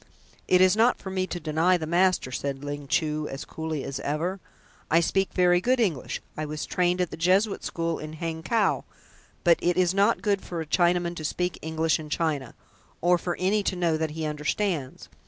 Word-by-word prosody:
"It 180 Hz, 0 st, +5 dB
is 185 Hz, +1 st, +5 dB
not 230 Hz, +3 st, +4 dB
for 190 Hz, -, -7 dB
me 185 Hz, -1 st, -1 dB
to 175 Hz, -, -4 dB
deny 165 Hz, +3 st, +2 dB
the 160 Hz, -, -4 dB
master," 175 Hz, -4 st, +2 dB
said 135 Hz, +1 st, -3 dB
Ling 145 Hz, 0 st, -5 dB
Chu 155 Hz, -1 st, 0 dB
as 135 Hz, -, -6 dB
coolly 160 Hz, -3 st, -4 dB
as 135 Hz, -, -4 dB
ever. 170 Hz, +7 st, -2 dB, 0.5 s
"I 165 Hz, -, +5 dB
speak 190 Hz, +3 st, +1 dB
very 180 Hz, -1 st, +3 dB
good 255 Hz, +5 st, +2 dB
English. 180 Hz, -, -1 dB
I 155 Hz, -, -3 dB
was 150 Hz, 0 st, -4 dB
trained 180 Hz, 0 st, +1 dB
at 180 Hz, -, -1 dB
the -, -, -6 dB
Jesuit 190 Hz, +5 st, +2 dB
School 165 Hz, -1 st, -2 dB
in 155 Hz, 0 st, -7 dB
Hangkow, 165 Hz, +7 st, 0 dB, 0.6 s
but 170 Hz, -2 st, +5 dB
it 175 Hz, 0 st, +1 dB
is 180 Hz, -1 st, +3 dB
not 200 Hz, +4 st, +2 dB
good 200 Hz, -3 st, +1 dB
for 175 Hz, -, -6 dB
a 160 Hz, -, -3 dB
Chinaman 175 Hz, +1 st, +2 dB
to 155 Hz, -, -6 dB
speak 180 Hz, +3 st, -2 dB
English 160 Hz, 0 st, 0 dB
in 155 Hz, -1 st, -8 dB
China, 150 Hz, -5 st, -1 dB, 0.4 s
or 175 Hz, +1 st, +3 dB
for 175 Hz, +1 st, -3 dB
any 195 Hz, +3 st, +2 dB
to 195 Hz, -, -1 dB
know 170 Hz, -3 st, +1 dB
that 160 Hz, 0 st, -1 dB
he 160 Hz, -, -2 dB
understands. 150 Hz, 0 st, -2 dB
170 Hz, 200 wpm, -26 LUFS, 155-185 Hz, 0.6 s, It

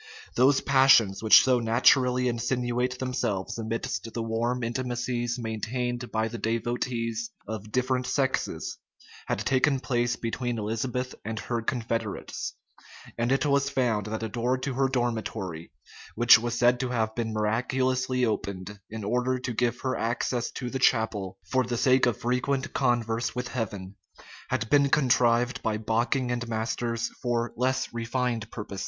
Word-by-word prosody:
Those 135 Hz, +1 st, +4 dB
passions 130 Hz, -7 st, +5 dB
which 110 Hz, -1 st, +8 dB
so 130 Hz, -2 st, +3 dB
naturally 125 Hz, +2 st, +3 dB
insinuate 125 Hz, +1 st, -1 dB
themselves 125 Hz, -6 st, -2 dB
amidst 115 Hz, 0 st, -3 dB
the 115 Hz, 0 st, -3 dB
warm 120 Hz, +2 st, -1 dB
intimacies 120 Hz, 0 st, -2 dB
maintained 120 Hz, +2 st, -3 dB
by 110 Hz, 0 st, 0 dB
the 115 Hz, +1 st, -6 dB
devotees 115 Hz, 0 st, -2 dB, 0.2 s
of 110 Hz, 0 st, -6 dB
different 125 Hz, +1 st, 0 dB
sexes, 135 Hz, -2 st, -1 dB, 0.5 s
had -, -, 0 dB
taken 135 Hz, +1 st, +2 dB
place 120 Hz, -1 st, 0 dB
between 120 Hz, 0 st, -3 dB
Elizabeth 120 Hz, +4 st, -2 dB
and 110 Hz, +1 st, -4 dB
her 115 Hz, +1 st, -2 dB
confederates; 115 Hz, -2 st, -3 dB, 0.6 s
and 120 Hz, +2 st, 0 dB
it 135 Hz, +2 st, +2 dB
was 140 Hz, -1 st, +2 dB
found 120 Hz, -7 st, 0 dB
that 110 Hz, +1 st, -4 dB
a -, -, -1 dB
door 120 Hz, +3 st, 0 dB
to 130 Hz, +1 st, -3 dB
her 135 Hz, +1 st, +2 dB
dormitory, 110 Hz, -9 st, -3 dB, 0.4 s
which 120 Hz, 0 st, +7 dB
was 120 Hz, +1 st, -2 dB
said 120 Hz, +1 st, +4 dB
to 130 Hz, -, -1 dB
have 110 Hz, -3 st, 0 dB
been 115 Hz, -1 st, -2 dB
miraculously 125 Hz, +4 st, 0 dB
opened, 100 Hz, -2 st, -3 dB
in 110 Hz, -1 st, -6 dB
order 125 Hz, +4 st, 0 dB
to 125 Hz, -1 st, -4 dB
give 120 Hz, +1 st, 0 dB
her 130 Hz, -1 st, -1 dB
access 120 Hz, +1 st, -1 dB
to 125 Hz, -2 st, -5 dB
the 135 Hz, -, -2 dB
chapel, 110 Hz, -6 st, +1 dB
for 130 Hz, +7 st, +1 dB
the 120 Hz, -1 st, -3 dB
sake 130 Hz, +1 st, +4 dB
of 120 Hz, -, 0 dB
frequent 125 Hz, +2 st, -1 dB
converse 120 Hz, -2 st, 0 dB
with 125 Hz, 0 st, -3 dB
Heaven, 100 Hz, -5 st, -4 dB, 0.5 s
had 110 Hz, -, -1 dB
been 140 Hz, +2 st, +4 dB
contrived 125 Hz, -3 st, +3 dB
by 110 Hz, -1 st, -1 dB
Bocking 120 Hz, +4 st, 0 dB
and 120 Hz, 0 st, -2 dB
Masters 115 Hz, +1 st, -2 dB
for 120 Hz, -1 st, -1 dB
less 130 Hz, +1 st, 0 dB
refined 115 Hz, -1 st, -2 dB
purposes. 105 Hz, -4 st, -7 dB
120 Hz, 150 wpm, -27 LUFS, 115-125 Hz, 0.6 s, which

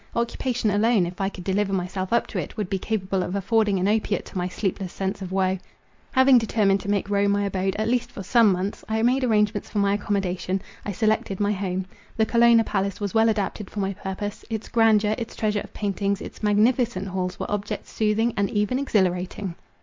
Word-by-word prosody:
Occupation 235 Hz, -1 st, 0 dB
alone, 210 Hz, -1 st, +3 dB
if 180 Hz, +3 st, -6 dB
I 195 Hz, -, +1 dB
could 185 Hz, -2 st, -9 dB
deliver 195 Hz, +2 st, 0 dB
myself 185 Hz, 0 st, -2 dB
up 235 Hz, 0 st, +3 dB
to -, -, -3 dB
it, -, -, -6 dB
would 205 Hz, -4 st, -3 dB
be 195 Hz, -, 0 dB
capable 195 Hz, -2 st, -1 dB
of 180 Hz, +1 st, -3 dB
affording 210 Hz, 0 st, +2 dB
an 185 Hz, +1 st, +1 dB
opiate 210 Hz, -1 st, 0 dB
to -, -, -8 dB
my 180 Hz, -, -1 dB
sleepless 190 Hz, -1 st, -3 dB
sense 195 Hz, +1 st, -3 dB
of 185 Hz, -1 st, -6 dB
woe. 190 Hz, 0 st, +1 dB, 0.5 s
Having 260 Hz, -1 st, +6 dB
determined 205 Hz, -3 st, +2 dB
to 200 Hz, -, -6 dB
make 200 Hz, -1 st, 0 dB
Rome 200 Hz, 0 st, +3 dB
my 205 Hz, 0 st, +1 dB
abode, 195 Hz, -1 st, -1 dB
at 215 Hz, +1 st, -1 dB
least 245 Hz, +1 st, 0 dB
for 195 Hz, -, -7 dB
some 230 Hz, +1 st, +5 dB
months, 185 Hz, +2 st, -2 dB
I 220 Hz, 0 st, 0 dB
made 255 Hz, +3 st, +3 dB
arrangements 210 Hz, -3 st, +1 dB
for -, -, -5 dB
my 200 Hz, 0 st, +3 dB
accommodation—I 195 Hz, -1 st, -2 dB
selected 215 Hz, -1 st, 0 dB
my 205 Hz, 0 st, +2 dB
home. 190 Hz, -2 st, -2 dB, 0.3 s
The 220 Hz, -, +3 dB
Colonna 235 Hz, 0 st, +5 dB
Palace 195 Hz, -2 st, -2 dB
was 205 Hz, -2 st, -3 dB
well 225 Hz, 0 st, +4 dB
adapted 210 Hz, -1 st, -2 dB
for 210 Hz, -, -6 dB
my 195 Hz, 0 st, -1 dB
purpose. 200 Hz, +1 st, -5 dB
Its 220 Hz, -1 st, -4 dB
grandeur— 215 Hz, -2 st, +4 dB
its 230 Hz, -, -6 dB
treasure 210 Hz, -2 st, 0 dB
of -, -, -10 dB
paintings, 200 Hz, -1 st, -1 dB
its -, -, -9 dB
magnificent 215 Hz, -1 st, +2 dB
halls 180 Hz, -1 st, -3 dB
were -, -, -4 dB
objects 205 Hz, -1 st, -3 dB
soothing 220 Hz, +2 st, +1 dB
and 200 Hz, -2 st, +1 dB
even 210 Hz, +5 st, 0 dB
exhilarating. 185 Hz, -6 st, 0 dB
205 Hz, 205 wpm, -24 LUFS, 190-220 Hz, 0.5 s, Having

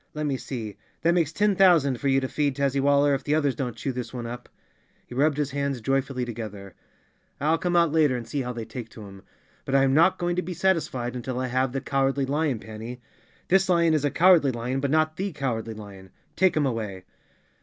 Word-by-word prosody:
Let 150 Hz, 0 st, -2 dB
me 140 Hz, -2 st, 0 dB
see, 115 Hz, -6 st, -6 dB, 0.3 s
that 170 Hz, +1 st, +4 dB
makes 165 Hz, -4 st, +1 dB
ten 205 Hz, +3 st, +1 dB
thousand 165 Hz, -10 st, +4 dB
for 140 Hz, -, -2 dB
you 135 Hz, 0 st, +4 dB
to 130 Hz, -, -2 dB
feed, 145 Hz, -1 st, -1 dB
Tazzywaller, 140 Hz, +1 st, +2 dB
if 135 Hz, 0 st, -2 dB
the 150 Hz, +2 st, +1 dB
others 145 Hz, -3 st, +1 dB
don't 125 Hz, -1 st, -4 dB
chew 135 Hz, -, -3 dB
this 125 Hz, -2 st, -5 dB
one 120 Hz, -2 st, -6 dB
up." 120 Hz, +1 st, -7 dB, 0.6 s
He -, -, -11 dB
rubbed 145 Hz, +3 st, +2 dB
his 145 Hz, -2 st, -1 dB
hands 140 Hz, -1 st, -2 dB
joyfully 135 Hz, +1 st, -1 dB
together. 105 Hz, -4 st, -7 dB, 0.7 s
"I'll 155 Hz, +4 st, +1 dB
come 175 Hz, -1 st, -1 dB
out 170 Hz, -3 st, +4 dB
later 150 Hz, -4 st, +3 dB
on 120 Hz, -, -3 dB
and 115 Hz, -, -12 dB
see 145 Hz, -, -2 dB
how 125 Hz, -1 st, -3 dB
they 115 Hz, -2 st, -6 dB
take 115 Hz, +1 st, -8 dB
to 110 Hz, -4 st, -11 dB
him. 95 Hz, -1 st, -12 dB, 0.4 s
But 135 Hz, -, -2 dB
I 135 Hz, -, +5 dB
am 135 Hz, -1 st, +2 dB
not 165 Hz, +6 st, +4 dB
going 175 Hz, 0 st, -1 dB
to -, -, +2 dB
be 180 Hz, -1 st, -6 dB
satisfied 155 Hz, -9 st, 0 dB
until 125 Hz, 0 st, -4 dB
I 130 Hz, 0 st, -2 dB
have 130 Hz, +1 st, 0 dB
the 135 Hz, +1 st, -3 dB
Cowardly 135 Hz, 0 st, 0 dB
Lion, 145 Hz, -1 st, 0 dB
Panny. 110 Hz, +3 st, -8 dB, 0.5 s
This 190 Hz, +1 st, +3 dB
lion 170 Hz, -2 st, +4 dB
is 155 Hz, -2 st, +1 dB
a 145 Hz, -, +2 dB
cowardly 165 Hz, -2 st, +5 dB
lion 125 Hz, +2 st, -3 dB
but 140 Hz, 0 st, -1 dB
not 155 Hz, +1 st, +1 dB
the 195 Hz, -1 st, -3 dB
Cow¬ 130 Hz, -6 st, -2 dB
ardly 110 Hz, 0 st, -8 dB
Lion. 100 Hz, -3 st, -11 dB, 0.3 s
Take 185 Hz, -4 st, +3 dB
him 150 Hz, -, +2 dB
away!" 105 Hz, -7 st, -3 dB
135 Hz, 230 wpm, -25 LUFS, 120-155 Hz, 0.7 s, I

